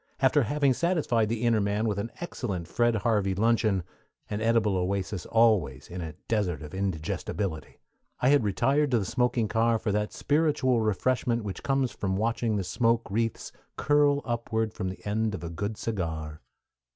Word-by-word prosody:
After 140 Hz, +2 st, +4 dB
having 140 Hz, +2 st, +2 dB
satisfied 145 Hz, -, +1 dB
the 115 Hz, 0 st, -2 dB
inner 115 Hz, -3 st, +3 dB
man 100 Hz, +2 st, 0 dB
with 105 Hz, -2 st, -1 dB
an 105 Hz, -, -3 dB
excellent 100 Hz, -, -4 dB
Fred 120 Hz, -1 st, +1 dB
Harvey 105 Hz, -3 st, +1 dB
luncheon 110 Hz, -3 st, +2 dB, 0.5 s
an 105 Hz, +1 st, -2 dB
edible 115 Hz, -3 st, +2 dB
oasis 95 Hz, 0 st, -2 dB
always 105 Hz, -, +2 dB
in 90 Hz, +1 st, -5 dB
a 80 Hz, -2 st, -6 dB
desert 95 Hz, -8 st, -1 dB
of 75 Hz, -, -9 dB
indigestibility 95 Hz, -1 st, -3 dB, 0.4 s
I 125 Hz, -, +3 dB
had 145 Hz, -3 st, +4 dB
retired 135 Hz, +9 st, +2 dB
to 125 Hz, -, +3 dB
the 100 Hz, -, -1 dB
smoking 125 Hz, 0 st, +1 dB
car 115 Hz, +2 st, +2 dB
for 105 Hz, -, -2 dB
that 105 Hz, +1 st, -1 dB
spiritual 145 Hz, -5 st, +1 dB
refreshment 115 Hz, +2 st, 0 dB
which 100 Hz, -2 st, -5 dB
comes 135 Hz, -3 st, 0 dB
from 95 Hz, -1 st, -2 dB
watching 115 Hz, +1 st, 0 dB
the 100 Hz, -, -1 dB
smoke 115 Hz, +3 st, 0 dB
wreaths 115 Hz, +1 st, -1 dB, 0.3 s
curl 145 Hz, -1 st, +3 dB
upward 115 Hz, -2 st, -1 dB
from 95 Hz, -, -3 dB
the 95 Hz, -, -9 dB
end 105 Hz, 0 st, 0 dB
of 95 Hz, -, -8 dB
a 85 Hz, -, -4 dB
good 100 Hz, +5 st, -4 dB
cigar. 80 Hz, -7 st, -4 dB
110 Hz, 170 wpm, -27 LUFS, 95-120 Hz, 0.5 s, After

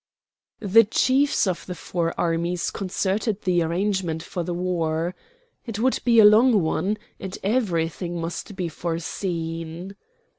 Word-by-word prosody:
The 220 Hz, +2 st, +6 dB
chiefs 265 Hz, +6 st, +2 dB
of 185 Hz, -3 st, -2 dB
the 180 Hz, -, -5 dB
four 170 Hz, -1 st, -2 dB
armies 170 Hz, +1 st, 0 dB
concerted 195 Hz, +2 st, -2 dB
the 180 Hz, -2 st, +2 dB
arrangements 170 Hz, -1 st, -1 dB
for 180 Hz, -, -4 dB
the 175 Hz, +1 st, -3 dB
war. 170 Hz, -1 st, -1 dB, 0.5 s
It 225 Hz, -3 st, -4 dB
would 255 Hz, +4 st, +1 dB
be 235 Hz, -2 st, +3 dB
a 220 Hz, -, +9 dB
long 215 Hz, -1 st, +6 dB
one, 195 Hz, +6 st, 0 dB, 0.2 s
and 190 Hz, 0 st, -6 dB
everything 175 Hz, -5 st, -1 dB
must 170 Hz, +5 st, -5 dB
be 180 Hz, -2 st, -2 dB
foreseen. 165 Hz, +1 st, -4 dB
180 Hz, 135 wpm, -24 LUFS, 170-210 Hz, 0.5 s, a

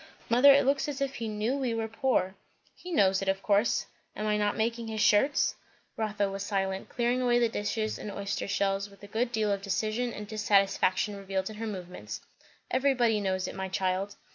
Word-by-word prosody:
"Mother, 250 Hz, +5 st, +7 dB
it 275 Hz, -1 st, +5 dB
looks 275 Hz, +2 st, +2 dB
as 290 Hz, -1 st, -4 dB
if 275 Hz, -1 st, -1 dB
he 230 Hz, -, -3 dB
knew 215 Hz, +4 st, -1 dB
we 255 Hz, -4 st, -1 dB
were 225 Hz, -1 st, -2 dB
poor." 225 Hz, -5 st, 0 dB, 0.4 s
"He 360 Hz, -, -10 dB
knows 195 Hz, -, +3 dB
it, 195 Hz, -, -4 dB
of 195 Hz, 0 st, -1 dB
course. 205 Hz, +2 st, +2 dB, 0.3 s
Am 215 Hz, -, -3 dB
I 210 Hz, 0 st, +2 dB
not 205 Hz, -1 st, 0 dB
making 230 Hz, +1 st, -1 dB
his 220 Hz, -1 st, -4 dB
shirts?" 240 Hz, +8 st, +3 dB, 0.4 s
Rotha 210 Hz, -2 st, -1 dB
was 195 Hz, 0 st, -5 dB
silent, 195 Hz, -1 st, -2 dB
clearing 245 Hz, +1 st, 0 dB
away 240 Hz, -1 st, +3 dB
the 240 Hz, -1 st, +4 dB
dishes 215 Hz, 0 st, -2 dB
and 210 Hz, -, -6 dB
oyster 200 Hz, 0 st, -3 dB
shells 200 Hz, 0 st, 0 dB
with 200 Hz, 0 st, -19 dB
a -, -, -8 dB
good 235 Hz, +4 st, -1 dB
deal 215 Hz, -3 st, +1 dB
of 200 Hz, -1 st, -1 dB
decision 215 Hz, +4 st, -1 dB
and 210 Hz, -2 st, -7 dB
dissatisfaction 200 Hz, -1 st, +2 dB
revealed 195 Hz, 0 st, -3 dB
in 215 Hz, -, -10 dB
her 225 Hz, +1 st, -4 dB
movements. 180 Hz, -, -7 dB, 0.5 s
"Everybody 250 Hz, -5 st, +2 dB
knows 185 Hz, -1 st, -1 dB
it, -, -, -6 dB
my 190 Hz, 0 st, -4 dB
child." 190 Hz, +1 st, -1 dB
210 Hz, 200 wpm, -29 LUFS, 195-235 Hz, 0.5 s, Mother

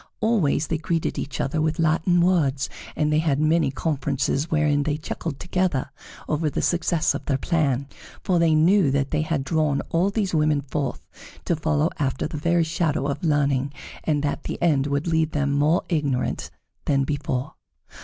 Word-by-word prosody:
Always 200 Hz, -10 st, +2 dB
they 160 Hz, 0 st, -2 dB
greeted 165 Hz, 0 st, -1 dB
each 145 Hz, -, -5 dB
other 155 Hz, +3 st, 0 dB
with 155 Hz, 0 st, 0 dB
Latin 165 Hz, +2 st, +2 dB
words, 145 Hz, -7 st, +1 dB, 0.2 s
and 150 Hz, 0 st, +1 dB
they 155 Hz, -, +3 dB
had 150 Hz, -3 st, +1 dB
many 155 Hz, +1 st, +3 dB
conferences 140 Hz, 0 st, -1 dB
wherein 150 Hz, -2 st, +2 dB
they 145 Hz, 0 st, -1 dB
chuckled 155 Hz, -1 st, -5 dB
together 180 Hz, -7 st, -1 dB, 0.4 s
over 155 Hz, 0 st, 0 dB
the -, -, -2 dB
success 170 Hz, -2 st, +1 dB
of -, -, -5 dB
their 135 Hz, -, +1 dB
plan, 140 Hz, -3 st, 0 dB, 0.4 s
for 180 Hz, -2 st, +2 dB
they 165 Hz, -2 st, +4 dB
knew 175 Hz, +1 st, +4 dB
that 140 Hz, 0 st, 0 dB
they 150 Hz, -, +1 dB
had 155 Hz, -3 st, -1 dB
drawn 150 Hz, -1 st, +1 dB
all 175 Hz, +4 st, +2 dB
these 200 Hz, -3 st, -1 dB
women 150 Hz, -2 st, +2 dB
forth 140 Hz, 0 st, -4 dB, 0.4 s
to 170 Hz, -, +1 dB
follow 155 Hz, +1 st, +1 dB
after 135 Hz, -3 st, -1 dB
the 155 Hz, -, -4 dB
very 170 Hz, +3 st, +2 dB
shadow 160 Hz, -3 st, -1 dB
of 140 Hz, +3 st, -3 dB
learning, 140 Hz, -3 st, +1 dB, 0.3 s
and 150 Hz, -2 st, 0 dB
that 145 Hz, -, -2 dB
the -, -, -4 dB
end 145 Hz, -5 st, +2 dB
would 140 Hz, +1 st, -1 dB
leave 160 Hz, -2 st, +1 dB
them 140 Hz, -1 st, 0 dB
more 150 Hz, +4 st, +2 dB
ignorant 145 Hz, -6 st, -1 dB, 0.4 s
than 140 Hz, -1 st, +2 dB
before. 140 Hz, 0 st, -2 dB
155 Hz, 175 wpm, -24 LUFS, 140-165 Hz, 0.4 s, they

